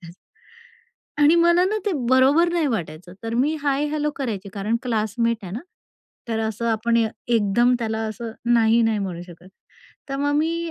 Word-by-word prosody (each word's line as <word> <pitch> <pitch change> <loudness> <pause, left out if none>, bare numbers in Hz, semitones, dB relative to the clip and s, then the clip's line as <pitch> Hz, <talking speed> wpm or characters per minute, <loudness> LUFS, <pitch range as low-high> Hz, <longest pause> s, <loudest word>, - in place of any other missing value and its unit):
त्याचं. 170 -1 -12 1.1
आणि 295 +3 +5
मला 345 +1 +4
ना 420 +3 0
ते 405 - 0 0.2
बरोबर 270 +7 +4
नाही 335 -4 +1
वाटायचं, 175 - -4
तर 225 0 -4
मी 280 +6 +1
हाय 285 0 +1
हॅलो 300 0 -1
करायची 215 -8 -4
कारण 210 +3 -1
क्लासमेट 230 0 0
आहे 185 -1 -8
ना. 230 - -4 0.7
तर 225 -1 -1
असं 230 +2 -4
आपण 230 +1 +1
एकदम 230 +1 +1
त्याला 220 -1 -2
असं 225 +1 -6 0.2
नाही-नाही 225 -1 +3
म्हणू 180 -3 -4
शकत. 175 +1 -14 0.6
तर 275 - -3
मग 285 +1 0
मी 335 +1 -1
235 Hz, 165 wpm, -22 LUFS, 215-290 Hz, 1.1 s, आणि